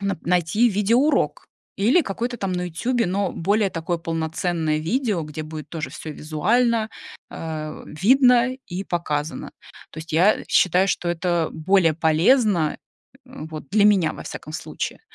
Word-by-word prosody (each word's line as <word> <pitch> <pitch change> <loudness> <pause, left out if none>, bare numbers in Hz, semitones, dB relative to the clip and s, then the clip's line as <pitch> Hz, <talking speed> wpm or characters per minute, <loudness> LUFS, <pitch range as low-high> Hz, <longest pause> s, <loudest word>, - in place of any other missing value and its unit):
нап 200 -4 -2
найти 180 +7 +2
видеоурок 230 +9 +1 0.3
или 230 - +4
какой-то 240 - -3
там 195 -4 -3
на 180 0 -2
"Ютубе" 230 +8 -1
Но 195 +1 -1
более 200 +3 +1
такой 170 +1 -3
полноценное 165 -1 -1
видео, 200 - -1
где 150 0 -6
будет 155 -1 -8
тоже 160 -2 -5
всё 155 - -7
визуально, 220 +10 +1 0.4
э, - - -11
м, 155 -1 -6
видно 250 +2 +5
и 185 +2 -4
показано. 155 -4 -3 0.4
То - - -10
есть 160 0 -8
я, 180 +7 +4
э, - - -10
считаю, 185 +1 +3
что 180 -2 -1
это 175 -1 0
более 165 +1 +3
полезно, 165 - +2 0.5
э, - - -18 0.2
вот 155 -3 -8
для 205 +1 +3
меня, 195 -6 +4
во - - -9
всяком 155 - -8
случае. 155 - -5
180 Hz, 155 wpm, -22 LUFS, 160-210 Hz, 0.5 s, видно